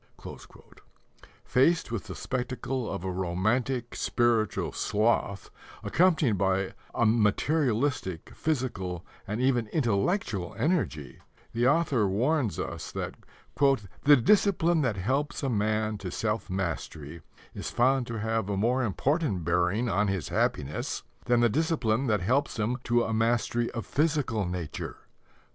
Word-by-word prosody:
Faced 150 +2 +2
with 110 -3 -3
the 95 - -6
spectacle 125 0 -3
of - - -4
a 95 - -2
romantic 110 +8 -1
spiritual 115 -3 +1
sloth 105 -2 0 0.3
accompanied 160 - +3
by 95 0 +1 0.2
a 115 - +2
materialistic, 115 - +1
physical, 100 - -2 0.2
and 105 +3 -3
even 125 -3 +2
intellectual 110 - 0
energy, 145 - -1 0.3
the 120 +2 +2
author 145 -7 +3
warns 120 +4 +1
us - - -5
that - - -4 0.9
"the 145 0 +9
discipline 175 - +3
that 120 -8 0
helps 140 +10 -1
a 135 - +1
man 110 -1 0
to 95 -2 -5
self 105 +2 -2
mastery 85 -4 -4 0.3
is - - -5
found 125 +1 +2
to 115 - -4
have 110 -2 -1
a 100 - -1
more 125 +6 +2
important 125 - 0
bearing 90 +7 +1
on 100 0 +1
his 95 -4 -2
happiness 75 +1 -1 0.2
than 120 -1 +3
the 120 - +5
discipline 135 -3 +1
that 105 -4 +1
helps 130 +10 +1
him 110 +3 0
to 120 0 +3
a 110 - -2
mastery 115 +1 +1
of 115 - -5
physical 145 - 0
nature." 90 -4 -5
115 Hz, 130 wpm, -28 LUFS, 100-130 Hz, 0.9 s, the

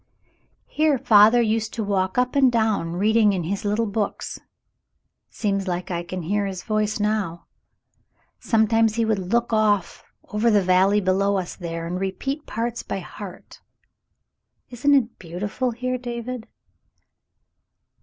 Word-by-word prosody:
"Here 305 -2 +1
father 220 +1 +6
used 220 0 -1
to 225 - -2
walk 190 -1 -1
up 250 +1 +1
and 265 -3 +5
down 220 -7 0
reading 210 +3 +3
in 180 -3 -2
his 195 +4 -3
little 210 +2 0
books; 205 -1 -3 0.9
seems 195 -2 -2
like 180 0 -3
I 170 -1 -1
can 175 +1 -6
hear 200 +4 0
his 190 -2 -6
voice 215 -1 -1
now. 210 -5 -1 0.9
Some 220 -2 +2
times 225 0 +2
he 230 -1 +1
would 220 -2 +1
look 235 0 +1
off 210 -4 +1 0.3
over 215 +3 +1
the 205 -3 +3
valley 190 +3 +3
below 195 +1 +1
us 185 -2 -4
there 165 -1 -5
and 180 +2 -3
repeat 270 +11 -3
parts 235 +1 -3
by - - -4
heart. - - -10 1.1
Isn't 280 +4 +3
it 235 -4 0
beautiful 195 +9 -3
here, 255 +2 -3
David.?" 240 -1 -6
210 Hz, 145 wpm, -23 LUFS, 190-230 Hz, 1.1 s, father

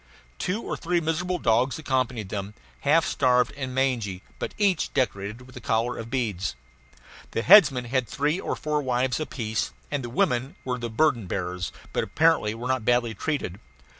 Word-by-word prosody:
Two 200 +6 -1
or - - -3
three 175 +1 0
miserable 170 +3 -1
dogs 120 +1 +2
accompanied 130 -8 -1
them, 100 0 -5 0.2
half 160 +3 +3
starved 125 -3 +2
and 130 -2 -4
mangy, 115 -8 0 0.2
but - - -4
each 195 -5 +2
decorated 105 -2 -1
with 130 +1 -15
a 125 - -8
collar 115 +2 0
of 115 0 -6
beads. 105 - -1 0.8
The 115 - 0
headmen 150 -10 +7
had 125 0 0
three 150 +5 0
or - - -2
four 150 -1 -1
wives 125 0 0
apiece, 115 -8 -2 0.2
and 145 -3 -1
the 120 - -5
women 125 +2 0
were 125 -1 -2
the 120 -1 -3
burden 115 -3 +2
bearers, 90 -1 -3 0.2
but - - +1
apparently 160 -10 +2
were 120 +2 -5
not 130 -3 0
badly 120 0 +2
treated. 110 - -3
125 Hz, 170 wpm, -26 LUFS, 110-145 Hz, 0.8 s, headmen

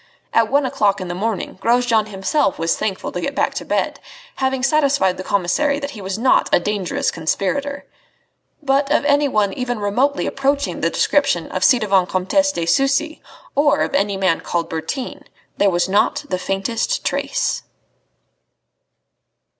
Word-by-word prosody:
At 230 -1 +3
one 280 +1 +2
o'clock 205 -6 +1
in 185 -1 -5
the - - -2
morning, 200 0 -3
Grosjean 235 -2 +2
himself 200 +4 0
was 165 - 0
thankful 205 -3 -3
to - - -4
get - - -3
back - - +1
to - - -4
bed, - - -1 0.4
having 265 -1 -1
satisfied 275 -10 +2
the 185 - -5
commissary 275 +12 +1
that 285 -1 -5
he 215 - -9
was 190 +1 -4
not 250 +3 +3
a - - +5
dangerous 195 0 -1
conspirator. 280 - -2 0.8
But 275 0 +1
of 295 - +2
anyone 280 -9 +2
even 245 0 -3
remotely 245 +8 0
approaching 280 +1 -1
the - - +2
description 280 - +1
of 185 - -3
the - - +6
ci 255 - +5
devant 195 -5 +1
Comtesse 285 +11 +1
de 170 -10 -3
Sucy, 275 - +1 0.3
or 290 +1 +3
of - - -1
any 200 -7 +1
man 185 -4 +1
called 170 -1 -3
Bertin, 205 - -5 0.3
there 200 - +4
was 175 -1 +1
not 200 +2 +1
the 185 -2 -1
faintest 220 - -2
trace. - - -1
225 Hz, 160 wpm, -20 LUFS, 190-280 Hz, 0.8 s, the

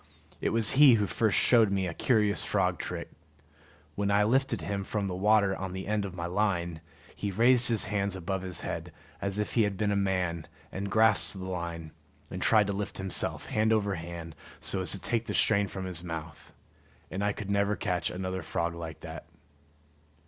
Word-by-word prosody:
It - - +1
was 110 -2 +4
he 140 -3 +7
who 105 -2 +1
first 110 0 +1
showed 115 -4 +5
me 95 -1 0
a 85 - -3
curious 105 0 +2
frog - - 0
trick. - - -5 0.8
When 100 0 -1
I 100 +1 +4
lifted 120 -2 +1
him 100 +5 -3
from 100 +1 -3
the 95 - -3
water 100 +1 +3
on 95 -1 -5
the 95 0 -5
end 105 0 -1
of 95 -2 -7
my 85 -1 -4
line, 85 -3 -1 0.3
he 105 - -3
raised 120 +5 +5
his 115 -3 +3
hands 100 -1 -1
above 95 +1 -3
his 90 -3 -2
head, - - -5 0.3
as 100 0 -2
if 105 - -2
he 115 - +3
had 100 -2 0
been 105 0 0
a - - +1
man, 90 -4 -1 0.2
and 100 +1 -4
grasped 110 -3 +4
the 95 - -6
line, 85 -3 -5 0.4
and - - -5
tried 110 -2 +4
to 100 - -2
lift 100 +1 -4
himself, 95 -1 -2
hand 110 +1 +1
over 105 -2 +1
hand, 85 -1 -7 0.3
so 95 - -1
as 90 - -1
to 100 - -5
take 115 +3 -1
the - - -3
strain 100 -2 +3
from 95 0 -6
his 90 -2 -6
mouth. 80 -3 -7 0.6
And 95 +2 -3
I 105 - +2
could 100 0 -6
never 100 +1 +1
catch 90 -6 -1
another 95 0 -4
frog 85 +1 -2
like 80 -2 -8
that. - - -9
100 Hz, 200 wpm, -29 LUFS, 90-105 Hz, 0.8 s, he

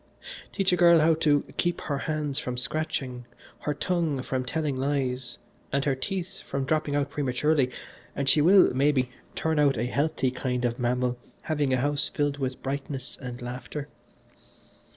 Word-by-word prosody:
Teach 195 -2 +1
a - - +6
girl 170 -1 +7
how 160 +1 +5
to 150 -2 +3
keep 175 -1 0
her 140 -3 -2
hands 150 -2 -1
from 125 -4 -4
scratching, 125 -3 -3 0.3
her 150 - -2
tongue 165 -6 0
from 130 -1 -1
telling 145 +2 -1
lies, 130 -2 -1 0.3
and 140 0 +1
her 140 - +3
teeth 180 +7 -4
from 135 -1 -3
dropping 155 0 0
out 145 0 0
prematurely, 140 0 +1 0.5
and 140 - -2
she 150 - +5
will, 185 +1 +6
maybe, 135 -2 +2 0.2
turn 160 -1 0
out 140 -4 +4
a 115 - 0
healthy 135 0 0
kind 125 -1 -1
of 120 +1 -1
mammal 125 0 0 0.2
having 150 -4 0
a 130 - +3
house 145 +3 0
filled 145 -1 -1
with 130 -1 -3
brightness 135 0 -4
and 125 -2 -7
laughter. 130 +4 -6
140 Hz, 165 wpm, -27 LUFS, 130-155 Hz, 0.5 s, girl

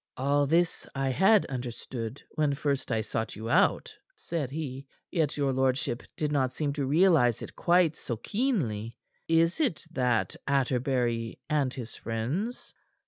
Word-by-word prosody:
"All 140 +2 +2
this 170 +3 +1
I 135 -1 0
had 195 - +4
understood 120 -1 -5
when 150 -3 +1
first 140 -2 -1
I 110 -1 +1
sought 110 +1 -3
you 110 +2 -4
out," 190 +5 +3 0.2
said 155 -7 -3
he. 140 -2 -5 0.2
"Yet 155 -5 0
your 140 -2 +1
lordship 130 -2 0 0.2
did 150 -1 -1
not 130 -3 +1
seem 145 -2 -1
to 140 -2 -2
realize 150 - +4
it - - -9
quite 175 -2 +3
so 120 -7 -5
keenly. 120 - -1 0.3
Is 165 - +3
it 265 - 0
that 125 -6 +1
Atterbury 125 -4 0
and 145 -4 +2
his 120 -4 -7
friends 130 - -3
140 Hz, 145 wpm, -28 LUFS, 125-160 Hz, 0.3 s, had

